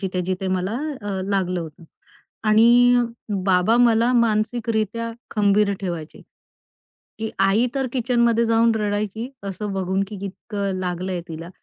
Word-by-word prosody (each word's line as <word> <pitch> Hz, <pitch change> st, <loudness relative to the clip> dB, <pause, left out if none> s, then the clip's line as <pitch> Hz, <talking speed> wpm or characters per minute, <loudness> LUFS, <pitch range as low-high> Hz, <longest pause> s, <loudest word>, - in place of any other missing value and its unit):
जिथे-जिथे 185 Hz, 0 st, -2 dB
मला 185 Hz, +2 st, -1 dB, 0.3 s
अ, 200 Hz, -2 st, -3 dB
लागलं 185 Hz, -3 st, 0 dB
होतं 160 Hz, +1 st, -9 dB, 0.6 s
आणि 240 Hz, +3 st, +6 dB, 0.5 s
बाबा 190 Hz, +4 st, +3 dB
मला 235 Hz, 0 st, +4 dB
मानसिकरीत्या 230 Hz, -1 st, 0 dB, 0.2 s
खंबीर 205 Hz, -1 st, +2 dB
ठेवायचे, 170 Hz, -5 st, -5 dB, 1.0 s
की 220 Hz, 0 st, -3 dB
आई 195 Hz, +5 st, +3 dB
तर 270 Hz, -1 st, 0 dB
किचनमध्ये 235 Hz, -2 st, +2 dB
जाऊन 230 Hz, 0 st, +3 dB
रडायची 210 Hz, +2 st, -2 dB, 0.2 s
असं 200 Hz, +1 st, -4 dB
बघून, 190 Hz, 0 st, -1 dB
की 210 Hz, -, -7 dB
इतकं 200 Hz, 0 st, -4 dB
लागलंय 180 Hz, 0 st, -3 dB
तिला 165 Hz, +1 st, -7 dB
205 Hz, 120 wpm, -22 LUFS, 185-230 Hz, 1.0 s, आणि